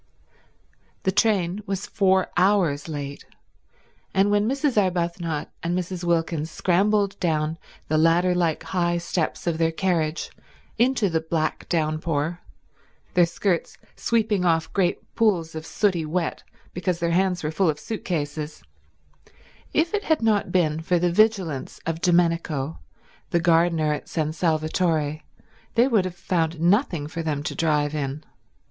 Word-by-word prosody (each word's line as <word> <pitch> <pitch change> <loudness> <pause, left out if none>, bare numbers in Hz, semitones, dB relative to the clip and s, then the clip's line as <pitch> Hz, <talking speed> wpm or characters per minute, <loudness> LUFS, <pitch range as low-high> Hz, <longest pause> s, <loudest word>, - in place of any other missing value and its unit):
The 190 - +2
train 195 -2 +1
was 195 0 -2
four 190 -2 +2
hours 175 -6 +2
late, 145 -2 -5 0.9
and 195 +2 +4
when 205 +2 +2
Mrs. 275 0 0
Arbuthnot 170 -5 0
and 175 +2 -1
Mrs. 180 0 -4
Wilkins 165 -2 0
scrambled 200 +3 +1
down 160 -1 0 0.3
the 155 0 +2
ladder 170 +3 +4
like 170 -3 0
high 175 -2 0
steps 170 -1 -2
of 165 -2 -1
their 165 0 +2
carriage 165 -3 -1 0.5
into 245 -3 +3
the 165 -3 0
black 160 -1 -2
downpour, 155 0 -1 0.7
their 175 -1 +5
skirts 175 0 -1 0.2
sweeping 220 -5 +1
off 165 -2 +1
great 185 -3 -1
pools 185 -8 +1
of 160 0 -7
sooty 185 -6 +1
wet 165 +2 -2 0.3
because 180 0 -1
their 170 -1 0
hands 180 0 +1
were 155 - -1
full 180 +1 +2
of 150 -1 -1
suit 220 - -5
cases, 150 -2 -3 1.1
if 330 +4 +1
it 415 0 -1
had 315 -7 +1
not 215 -2 +2
been 160 -4 +1
for 175 +2 +1
the 175 0 +1
vigilance 190 -8 +1
of 165 0 -3
Domenico, 165 -5 +1 0.5
the 175 - +2
gardener 165 -2 +3
at 150 - -6
San 155 -2 -1
Salvatore, 155 -2 0 0.6
they 235 +2 +5
would 220 -8 +2
have 180 -1 -5
found 165 -2 -1
nothing 175 - +2
for 160 +2 -5
them 150 -3 -2
to - - -3
drive 150 -2 +1
in. 145 0 -3
170 Hz, 145 wpm, -24 LUFS, 160-190 Hz, 1.1 s, their